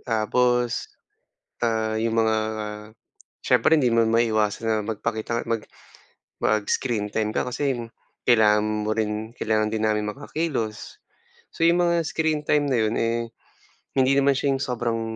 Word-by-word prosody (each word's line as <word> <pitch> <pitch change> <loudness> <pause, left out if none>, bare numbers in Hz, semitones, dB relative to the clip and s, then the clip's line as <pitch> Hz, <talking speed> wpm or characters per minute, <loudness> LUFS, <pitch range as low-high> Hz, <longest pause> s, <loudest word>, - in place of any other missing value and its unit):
Tapos, 120 +1 0 0.7
ah, 110 -2 0
'yong 115 0 0
mga, 110 -1 +3 1.0
syempre 160 -1 +3
hindi 125 - +3
mo 115 -1 +3
maiiwasan 110 -2 +1
na 110 - +2
magpakita 110 +1 -2
nga - - -8
mag 115 -2 -1 0.7
mag-screen 110 0 0
time 110 0 -1
ka - - +1
kasi 135 +2 -1 0.5
kailangan 105 -2 +3
mo 110 - 0
rin 110 +1 -3
kailangan 110 -2 0
din 110 0 -2
namin 105 -1 +1
makakilos, 130 -8 -4 0.5
so - - -7
'yong 175 +1 +4
mga 170 0 +2
screen 160 -2 0
time 145 -1 +2
na 125 - +2
'yon, 110 +1 0
eh, 115 0 -1 0.7
hindi 130 0 +4
naman 140 0 +4
siya 140 0 +1
'yong 135 - -3
sobrang, 120 -3 -2
115 Hz, 145 wpm, -24 LUFS, 110-125 Hz, 1.0 s, yong